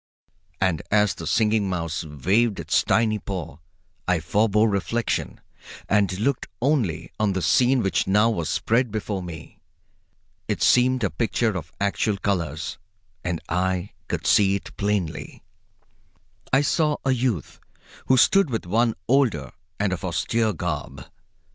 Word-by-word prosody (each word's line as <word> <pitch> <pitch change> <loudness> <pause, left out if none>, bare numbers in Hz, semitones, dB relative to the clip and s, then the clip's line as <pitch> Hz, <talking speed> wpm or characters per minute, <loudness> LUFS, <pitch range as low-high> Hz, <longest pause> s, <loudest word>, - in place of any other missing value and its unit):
And 95 -5 +1
as 105 -1 +3
the - - -7
Singing 110 -3 +2
Mouse 85 -3 -2
waved 95 - +1
its - - +2
tiny 110 -2 +2
paw 85 -7 -6 0.5
I 90 -2 +2
forbore 105 +6 +2
reflection 105 +3 -1 0.5
and 100 -3 +2
looked 130 +4 0
only 120 - 0
on 105 -2 +2
the 95 - -2
scene 130 -1 +3
which 95 - 0
now 105 +3 +4
was 85 -8 -2
spread 120 +2 +1
before 105 -2 -3
me. 85 -3 -9 0.9
It 105 - -1
seemed 125 0 +4
a 100 - +1
picture 110 +5 0
of 80 -3 -6
actual 100 +1 0
colors, 85 -6 -2 0.4
and 90 -2 -2
I 90 +2 -1 0.2
could - - -3
see 100 -1 +4
it 100 - -7
plainly. 100 -6 -2 1.1
I 135 - +4
saw 150 +1 +1
a 135 - +3
youth 120 - -1 0.5
who 130 - +4
stood 195 +6 +5
with 115 -6 -3
one 115 +5 +1
older 115 - +2 0.3
and 100 -2 +1
of 90 - -5
austere 110 +5 0
garb. 75 -7 -4
100 Hz, 140 wpm, -24 LUFS, 90-115 Hz, 1.1 s, stood